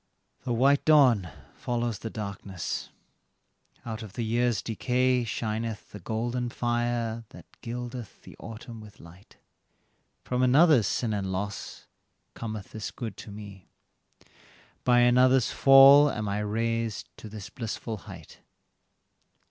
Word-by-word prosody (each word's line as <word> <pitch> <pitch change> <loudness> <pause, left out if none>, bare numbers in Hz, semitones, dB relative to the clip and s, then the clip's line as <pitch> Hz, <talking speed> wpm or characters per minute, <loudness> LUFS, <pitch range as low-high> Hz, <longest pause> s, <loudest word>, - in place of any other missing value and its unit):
The 125 - -2
white 135 +4 +3
dawn 130 - +5 0.2
follows 120 -3 -3
the 115 - -5
darkness; 100 -5 -5 1.0
out 110 -2 -5
of 105 -3 -9
the 115 - -3
years' 120 -1 +1
decay 125 +2 +1
Shineth 110 -1 -4
the 105 - -9
golden 120 +5 -2
fire 120 -1 -1
that - - -13 0.2
gildeth 120 -1 -7
the - - -13
autumn 115 0 -9
with 105 -2 -14
light; 90 +4 -16 0.9
From 125 0 -1
another's 135 - +5
sin 115 -3 -1
and 95 -2 -2
loss, 100 +2 -5 0.5
cometh 110 -3 -6
this 110 -1 -5
good 110 -5 -7
to - - -10
me, 100 -3 -11 1.1
By 120 -1 +4
another's 125 +1 +4
fall 135 +2 +8
am 105 -5 -3
I 100 +1 -1
raised 115 +1 -2
to 110 - -10
this 105 -2 -9
blissful 115 -1 -5
height. 95 -6 -12
115 Hz, 125 wpm, -27 LUFS, 105-125 Hz, 1.1 s, fall